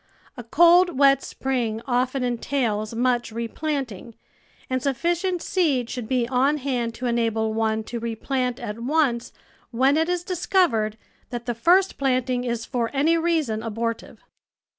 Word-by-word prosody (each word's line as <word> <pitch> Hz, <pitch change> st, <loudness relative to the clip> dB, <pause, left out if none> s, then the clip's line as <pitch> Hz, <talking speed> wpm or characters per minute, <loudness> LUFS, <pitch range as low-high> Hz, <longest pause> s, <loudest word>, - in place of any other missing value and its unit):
A 245 Hz, -, -8 dB
cold, 345 Hz, +5 st, +5 dB
wet 275 Hz, -1 st, +5 dB
spring 240 Hz, -5 st, -2 dB
often 255 Hz, +1 st, 0 dB
entails 235 Hz, -3 st, -1 dB
much 240 Hz, 0 st, 0 dB
replanting, 235 Hz, -1 st, -4 dB, 0.5 s
and 255 Hz, 0 st, -1 dB
sufficient 345 Hz, +6 st, -1 dB
seed 280 Hz, -10 st, 0 dB
should 245 Hz, -4 st, -5 dB
be 250 Hz, -2 st, 0 dB
on 265 Hz, +4 st, +2 dB
hand 250 Hz, -4 st, -2 dB
to 255 Hz, -, -6 dB
enable 225 Hz, -2 st, 0 dB
one 220 Hz, 0 st, 0 dB
to 235 Hz, +2 st, -5 dB
replant 250 Hz, +2 st, -2 dB
at 210 Hz, -2 st, -6 dB
once 255 Hz, -2 st, 0 dB, 0.4 s
when 265 Hz, +4 st, +2 dB
it 320 Hz, +2 st, +1 dB
is 355 Hz, -1 st, -1 dB
discovered 350 Hz, -, +1 dB, 0.3 s
that 240 Hz, -2 st, -5 dB
the 240 Hz, -, -1 dB
first 360 Hz, +11 st, +3 dB
planting 255 Hz, -2 st, 0 dB
is 235 Hz, -2 st, -3 dB
for 235 Hz, -2 st, -2 dB
any 310 Hz, +5 st, +3 dB
reason 320 Hz, -10 st, 0 dB
abortive. 230 Hz, +1 st, -4 dB
250 Hz, 140 wpm, -24 LUFS, 230-285 Hz, 0.5 s, cold